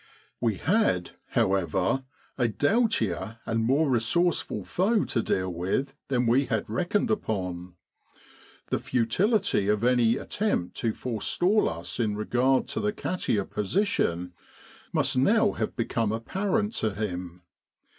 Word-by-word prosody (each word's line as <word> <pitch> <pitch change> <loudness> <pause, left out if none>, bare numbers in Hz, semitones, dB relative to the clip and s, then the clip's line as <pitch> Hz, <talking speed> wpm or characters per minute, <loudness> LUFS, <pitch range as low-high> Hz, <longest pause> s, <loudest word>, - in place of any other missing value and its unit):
We 115 -4 +1
had, 160 - +1 0.2
however, 95 - +1 0.3
a 125 -3 +1
doughtier 115 - 0
and 115 0 0
more 140 +7 +3
resource 135 +8 +2
ful - - -6
foe 205 +4 +1
to 115 - 0
deal 95 -4 -1
with 95 +11 -1
than 125 -3 +1
we 125 +4 +3
had 115 -4 -2
reckoned 175 - 0
upon. 90 - -3 1.0
The - - +1
futility 175 - +1
of 105 +1 +1
any 120 -2 +3
attempt 205 - -1
to 115 -2 0
forestall 175 - +1
us 85 +7 -5
in 110 -3 0
regard 125 +4 +2
to - - -2
the 210 - 0
Katia 145 - -1
position 95 - 0 0.6
must 130 - +1
now 210 - +4
have - - -3
become 115 -2 0
apparent 195 - -1
to 110 -3 -1
him. 90 -4 -5
115 Hz, 130 wpm, -27 LUFS, -, 1.0 s, now